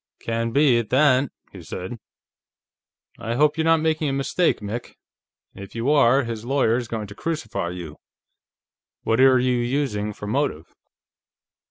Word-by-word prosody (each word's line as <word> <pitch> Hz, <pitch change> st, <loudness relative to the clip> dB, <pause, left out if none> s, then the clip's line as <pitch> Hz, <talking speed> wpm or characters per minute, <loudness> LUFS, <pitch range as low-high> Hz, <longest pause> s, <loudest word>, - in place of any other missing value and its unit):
"Can 115 Hz, 0 st, -2 dB
be, 130 Hz, -1 st, +4 dB
at 115 Hz, -, -4 dB
that," 135 Hz, -1 st, +3 dB, 0.2 s
he -, -, -11 dB
said. 95 Hz, +6 st, -7 dB, 1.2 s
"I 115 Hz, +2 st, -3 dB
hope 150 Hz, +3 st, +3 dB
you're 160 Hz, -, -1 dB
not 165 Hz, -1 st, +4 dB
making 155 Hz, -1 st, 0 dB
a -, -, -2 dB
mistake, 140 Hz, +6 st, +1 dB
Mick; 105 Hz, +4 st, -6 dB, 0.6 s
if 100 Hz, +2 st, -11 dB
you 115 Hz, +5 st, 0 dB
are, 140 Hz, -2 st, +4 dB
his 115 Hz, -2 st, -5 dB
lawyer's 120 Hz, -2 st, +1 dB
going 110 Hz, -2 st, -4 dB
to 100 Hz, -, -10 dB
crucify 110 Hz, -, -3 dB
you. 85 Hz, -4 st, -8 dB, 1.1 s
What 115 Hz, +1 st, +1 dB
are 130 Hz, -1 st, +6 dB
you 125 Hz, 0 st, +1 dB
using 120 Hz, -4 st, -1 dB
for 105 Hz, -, -9 dB
a -, -, -5 dB
motive?" 120 Hz, -, -1 dB
120 Hz, 155 wpm, -23 LUFS, 110-140 Hz, 1.2 s, are